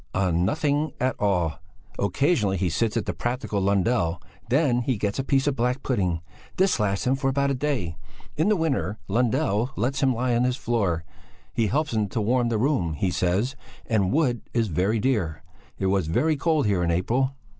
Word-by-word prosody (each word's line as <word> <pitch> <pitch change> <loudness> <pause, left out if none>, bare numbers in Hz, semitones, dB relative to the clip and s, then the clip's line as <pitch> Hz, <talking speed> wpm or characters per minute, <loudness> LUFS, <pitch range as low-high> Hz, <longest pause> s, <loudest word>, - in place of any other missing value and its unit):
"On 90 -3 +1
nothing 145 - 0
at 130 +1 +1
all! 90 -7 0 0.4
Occasionally 100 - +1
he 90 -1 0
sits 105 +7 0
to - - +2
the - - -3
practical 120 -4 -2
Lundell 95 -2 +1
and - - -27 0.2
then 130 -2 +3
he 125 -1 -1
gets 100 +4 -2
a - - 0
piece 135 0 +1
of 145 -2 +1
black 125 +2 -1
pudding. 90 -10 0 0.4
This 190 -7 +3
lasts 100 -2 0
him 125 - +3
for 135 0 0
about 140 +1 +1
a - - +1
day. 125 - -2 0.4
In 160 +7 +2
the 215 - +4
winter 140 - -1
Lundell 120 +1 +1
lets 130 +3 -1
him 130 -3 +3
lie 125 +1 0
on 120 - +2
his 125 0 +1
floor; 100 - 0 0.5
'he 115 -2 +1
helps 145 +2 0
to 115 - -2
warm 120 +3 +1
the 115 - 0
room,' 110 - +1
he 90 +5 -1
says, 95 +11 0 0.3
and 100 -5 +1
wood 130 -6 +1
is 115 -3 +2
very 95 +7 +1
dear; 100 -12 -1 0.3
it 95 - -2
was 95 -3 +1
very 155 - +2
cold 155 -1 +1
here 100 -4 +1
in 85 - +1
April." 125 +11 +1
120 Hz, 195 wpm, -25 LUFS, 95-135 Hz, 0.5 s, the